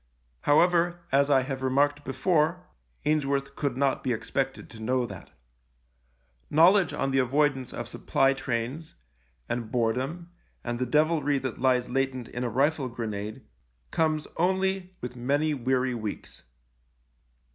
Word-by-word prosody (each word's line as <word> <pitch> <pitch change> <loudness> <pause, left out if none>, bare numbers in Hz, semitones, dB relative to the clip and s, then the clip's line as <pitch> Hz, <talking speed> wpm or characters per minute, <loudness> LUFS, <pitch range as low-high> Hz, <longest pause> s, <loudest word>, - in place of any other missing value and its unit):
How 145 +1 +6
ever, 175 0 +2
as 140 +1 +3
I 135 -2 +5
have 135 0 -4
remarked 145 +2 +1
before, 155 +6 +1 0.4
Ainsworth 140 -2 0
could 140 -4 -2
not 140 -1 +1
be 125 - +1
expected 135 +6 -3
to 110 -3 -10
know 125 +2 +1
that. - - -10 1.2
Know 165 +4 +7
ledge 195 -5 +2
on 135 - -1
the 135 - +2
avoidance 135 0 +1
of - - -5
supply 135 0 +1
trains, 135 +5 -4 0.5
and 120 -2 -3
boredom, 130 +9 -1 0.3
and 120 0 -3
the 125 - -1
devilry 150 +1 +2
that 130 -3 -4
lies 125 -1 +2
latent 130 -1 -1
in 120 - -4
a 120 - -1
rifle 135 +3 +1
grenade 110 -3 -5 0.5
comes 155 -2 +1
only 190 +1 0
with 125 0 -6
many 145 +5 +1
weary 130 -1 0
weeks. 110 - -6
135 Hz, 140 wpm, -27 LUFS, 125-155 Hz, 1.2 s, Know